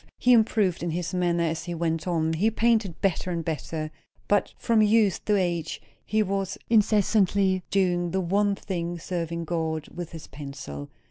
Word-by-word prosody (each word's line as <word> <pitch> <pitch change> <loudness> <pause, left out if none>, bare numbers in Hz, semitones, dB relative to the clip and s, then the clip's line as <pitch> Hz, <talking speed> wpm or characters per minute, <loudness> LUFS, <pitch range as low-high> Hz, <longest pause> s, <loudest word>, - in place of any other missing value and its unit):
He 250 - +4
improved 215 -5 +3
in 175 - -2
his 165 +1 -3
manner 175 -2 +1
as 165 0 -2
he 175 -1 -4
went 165 0 -1
on; 160 -2 +1
he 195 +8 +2
painted 225 -5 +1
better 185 -1 0
and 170 -2 -2
better; 155 -1 -3 0.4
but 205 -1 +2
from 230 -2 +2
youth 215 -2 +3
to 210 - +3
age 170 -4 -1 0.2
he 215 0 +1
was 195 -1 -2
incessantly 200 -3 +3
doing 175 -3 +1
the 190 - 0
one 200 +3 +1
thing, 175 -3 -4
serving 170 -1 -3
God 160 -2 -2
with 175 -2 -7
his 165 -2 -8
pencil. 135 - -8
175 Hz, 170 wpm, -26 LUFS, 165-200 Hz, 0.4 s, He